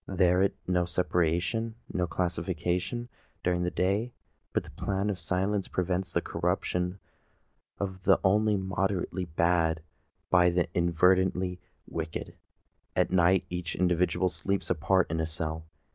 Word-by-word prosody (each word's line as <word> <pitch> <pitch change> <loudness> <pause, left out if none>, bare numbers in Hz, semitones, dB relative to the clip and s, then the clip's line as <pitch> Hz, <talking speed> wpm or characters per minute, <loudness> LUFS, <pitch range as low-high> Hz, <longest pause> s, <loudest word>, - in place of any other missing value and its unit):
There 90 -1 +3
it 100 - +2
no 90 -1 +2
separation—no 90 +4 0
classification—during 90 +3 -2
the 90 - +1
day; 100 +7 0 0.4
but - - 0
the - - -12
plan 100 +1 -1
of 95 - -5
silence 95 +1 0
prevents 90 0 -1
the - - +1
corruption 90 0 -1 0.8
of 95 -2 -4
the 95 0 +4
only 105 +2 +3
moderately 95 -1 -1
bad 80 -1 +1 0.5
by 90 -1 +6
the 85 0 +1
inveterately 90 +1 +2 0.3
wicked. 80 -1 -5 0.6
At - - +2
night 95 0 +4
each 90 -2 -3
individual 90 0 +2
sleeps 100 +2 -2
apart 90 +4 +3
in 80 - -1
a 80 - 0
cell. 80 0 -4
90 Hz, 125 wpm, -29 LUFS, 85-95 Hz, 0.8 s, by